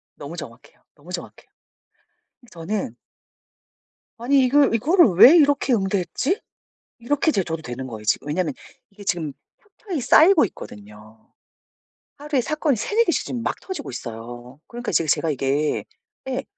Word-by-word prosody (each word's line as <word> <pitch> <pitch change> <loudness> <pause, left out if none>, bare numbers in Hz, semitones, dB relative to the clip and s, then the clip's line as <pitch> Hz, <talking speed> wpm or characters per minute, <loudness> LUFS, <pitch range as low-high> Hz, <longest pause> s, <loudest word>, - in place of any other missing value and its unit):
너무 - - -9
정확해요. - - -11
너무 - - -15
정확해요. - - -8 1.0
저는 170 - -4 1.2
'아니 265 +3 +3
이걸 275 -1 +3
이거를 330 - +4
왜 260 - +9
이렇게 285 -4 +3
응대했지?' 200 - -1 0.6
이렇게 290 +6 +1
제 195 - 0
저도 165 -1 -5
되는 130 0 -6
거예요 110 -3 -8
지금. 110 - 0
왜냐하면 155 -1 -1 0.4
이게 205 0 -13
지금 160 -7 -2 0.2
켜켜이 400 -6 -7
쌓이고 320 - +6
있거든요. 105 - -12 0.9
하루에 290 -2 -1
사건이 300 +1 0
3-4 430 - +1
개씩 340 - 0
지금 240 -2 -4
막 - - -3
터지고 370 -7 -6
있어요. 120 +2 -9
그러니까 240 0 -5
이제 165 - +2
제가 155 +1 +1
이게 140 +2 -1 0.5
예 260 +1 -2
205 Hz, 320 characters per minute, -22 LUFS, -, 1.2 s, 왜